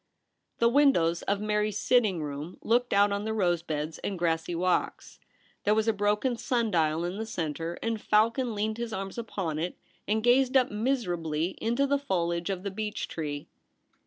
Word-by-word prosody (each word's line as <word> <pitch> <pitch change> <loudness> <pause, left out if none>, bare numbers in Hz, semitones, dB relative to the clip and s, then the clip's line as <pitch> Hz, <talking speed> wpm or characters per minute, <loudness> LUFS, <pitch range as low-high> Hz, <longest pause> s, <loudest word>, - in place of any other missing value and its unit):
The 235 - +4
windows 235 - +3
of 200 0 -1
Mary's 210 -1 0
sitting 215 -8 +2
room 145 +4 -6
looked 245 +2 +2
out 200 +1 +4
on 200 0 -1
the 220 0 -2
rose 175 -5 +2
beds 155 -1 -4
and 195 - -3
grassy 170 0 0
walks. 180 +1 -1 0.4
There 210 - +3
was 220 0 +1
a 225 - +4
broken 210 +4 +1
sun 235 -2 0
dial 160 -1 +1
in 180 +3 -4
the 220 - -2
centre, 165 -3 -3
and 225 -2 -1
Falcon 230 +3 +2
leaned 215 +2 -2
his 235 -1 -3
arms 195 +2 -4
upon 185 -9 -3
it 175 +2 -3 0.3
and 215 +2 +1
gazed 255 +2 +4
up 255 - +2
miser 225 -2 0
ably 160 0 -1
into 235 +5 +1
the 280 0 +1
foliage 170 -9 -1
of 190 -1 -3
the 200 - -3
beech 210 +1 -3
tree. 145 -3 -4
205 Hz, 185 wpm, -28 LUFS, 170-230 Hz, 0.4 s, The